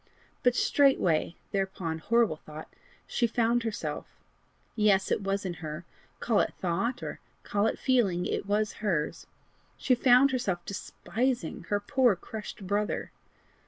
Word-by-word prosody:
But 245 -1 +3
straightway 185 - +3 0.2
thereupon 190 -5 -2
horrible 225 -2 +2
thought! 155 0 -11 0.3
she 240 - +1
found 235 +1 +2
herself 225 -2 -4 0.7
yes! 205 -3 +3
it - - +1
was 195 0 -1
in 180 - -2
her 155 +2 -6 0.3
call 225 -4 +2
it - - 0
thought, 195 +8 -1
or - - -5 0.2
call 205 +1 +1
it - - -1
feeling, 200 -9 +2
it - - -2
was 210 +1 +1
hers! 170 -8 -1 0.5
she 260 - +2
found 250 +2 +5
herself 190 -9 -1
despising 225 -2 -3
her 205 - +2
poor 250 0 +3
crushed 210 +2 -8
brother! 205 +2 -1
205 Hz, 135 wpm, -29 LUFS, 180-240 Hz, 0.7 s, found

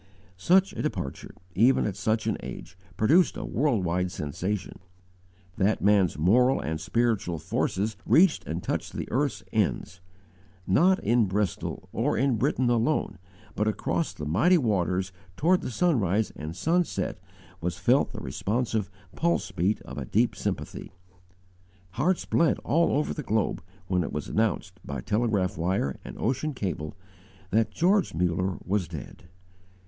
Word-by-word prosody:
Such 185 - +3
a - - -4
departure, 90 - -4 0.2
even 120 +8 +4
at 100 - -2
such 110 +2 0
an 110 - +1
age, - - -8 0.2
produced 165 +12 +4
a - - -4
worldwide 90 - 0
sensation. 90 +8 -4 0.8
That 100 +1 +1
man's 100 -6 +3
moral 125 - +4
and 80 +1 -3
spiritual 105 -2 0
forces 100 +7 -1
reached 180 +1 +4
and 85 +2 -3
touched - - -3
the - - -4
earth's 125 -7 0
ends. 90 -4 -1 0.6
Not 180 - +4
in 115 -2 +3
Bristol, 100 -1 -2
or - - 0
in 130 0 +2
Britain 125 +4 +1
alone, 120 - +1 0.4
but 105 - 0
across 150 +9 -1
the 75 - -7
mighty 110 - +4
waters 95 - 0 0.3
toward 180 +4 +3
the - - -4
sunrise 110 - +1
and 75 +2 -6
sunset 170 - 0 0.4
was 85 0 -3
felt 120 +10 +3
the - - -7
responsive 110 -1 -1 0.3
pulse 135 - 0
beat 95 +3 0
of - - -7
a 65 - -4
deep - - +1
sympathy. - - -4 1.0
Hearts 180 - 0
bled 165 -2 +2
all 165 +3 +2
over 150 - 0
the - - -4
globe 110 -5 0 0.2
when 90 -1 +1
it - - -3
was 75 - -4
announced, 110 0 -1
by 70 -2 -5
telegraph 105 - 0
wire 85 -6 -1
and - - -9
ocean 135 +5 -1
cable, 90 -8 -4 0.6
that 110 +2 +2
George 190 +3 +2
Muller 90 +2 0
was 95 -2 0
dead. 80 0 -9
105 Hz, 145 wpm, -27 LUFS, 90-130 Hz, 1.0 s, even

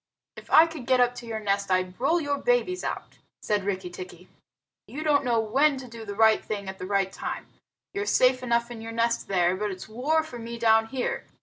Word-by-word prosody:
"If - - -12
I 320 - +8
could 320 -7 -8
get 255 -1 +4
up 245 0 +4
to 240 -1 -9
your 220 -1 -3
nest, 200 -1 -1
I'd 185 +1 0
roll 325 +6 +3
your 285 -3 -1
babies 405 -6 +1
out!" - - -5 0.2
said 210 -2 0
Rikki 190 -2 -3
tikki. 180 0 -10 0.6
"You 300 +3 -6
don't 290 -2 +3
know 240 -3 +2
when 270 +7 +2
to 260 -1 -8
do 230 -1 -9
the 205 -1 -6
right 220 0 +4
thing 200 -2 -4
at 190 0 -7
the 185 - -5
right 195 -1 +1
time. - - -5 0.5
You're 405 0 -3
safe 255 0 +4
enough 235 -1 0
in 230 -2 -7
your 225 0 -7
nest 230 0 0
there, 180 -2 +2
but 210 +2 -2
it's 185 -1 -7
war 280 +9 0
for 250 -6 -9
me 235 +1 -6
down 225 -1 +4
here. 255 +1 -3
230 Hz, 225 wpm, -26 LUFS, 200-265 Hz, 0.6 s, I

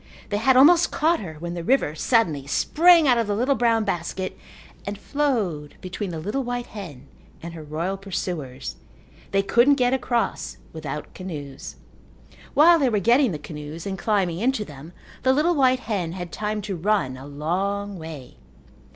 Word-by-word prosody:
They 205 - 0
had 255 +4 +4
almost 335 +6 +7
caught 330 +3 +2
her 160 -6 -7
when 170 +3 -6
the 170 -1 -5
river 250 - +2
suddenly 160 - +1
sprang 335 - +5
out 245 -2 +4
of 230 - 0
the 205 - 0
little 250 +6 +2
brown 230 -3 +2
basket 185 0 -3 0.5
and 200 0 -5
flowed 205 - -1
between 185 +2 -5
the 165 - -5
little 210 +11 -2
white 245 0 -3
hen 160 -11 -9 0.4
and 170 0 -6
her 165 - -8
royal 160 +6 -3
pursuers. 175 -9 -5 0.5
They 195 0 +1
couldn't 240 +8 +4
get 250 -1 +2
across 240 -2 -1 0.2
without 150 -2 -6
canoes. 150 -7 -7 0.8
While 335 +3 +7
they 270 -4 +3
were 215 - +1
getting 235 +5 +4
the 155 - -3
canoes 150 +1 -8
and 195 -1 -3
climbing 190 -5 0
into 235 -1 0
them 150 +1 -11 0.3
the 260 - +3
little 310 +6 +3
white 260 -4 +3
hen 180 -7 -2
had 175 -2 -6
time 210 0 -3
to 200 -1 -3
run 180 -7 0
a 130 +2 -10
long 190 +7 -2
way. 155 -6 -9
195 Hz, 170 wpm, -24 LUFS, 165-245 Hz, 0.8 s, almost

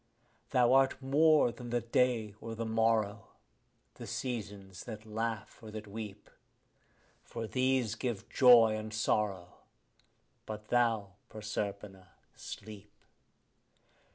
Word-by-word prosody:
Thou 125 -2 +4
art 135 0 +4
more 145 0 +4
than 120 0 -9
the 120 0 +1
day 115 -2 +1
or 115 0 -6
the 115 +1 -3
morrow, 110 -2 +1 0.7
the - - -10
seasons 100 -7 -5
that 110 -2 -8
laugh 110 0 -4
or 110 - -9
that 110 0 -7
weep; 105 -1 -8 0.9
For 115 - -6
these 130 -1 +1
give 115 -2 -4
joy 120 -4 +6
and 110 0 -5
sorrow; 105 -4 -1 0.9
but 105 0 -7
thou, 115 -5 +2 0.2
Proserpina, 100 -3 -5 0.2
sleep. 105 0 -10
110 Hz, 110 wpm, -32 LUFS, 105-120 Hz, 0.9 s, joy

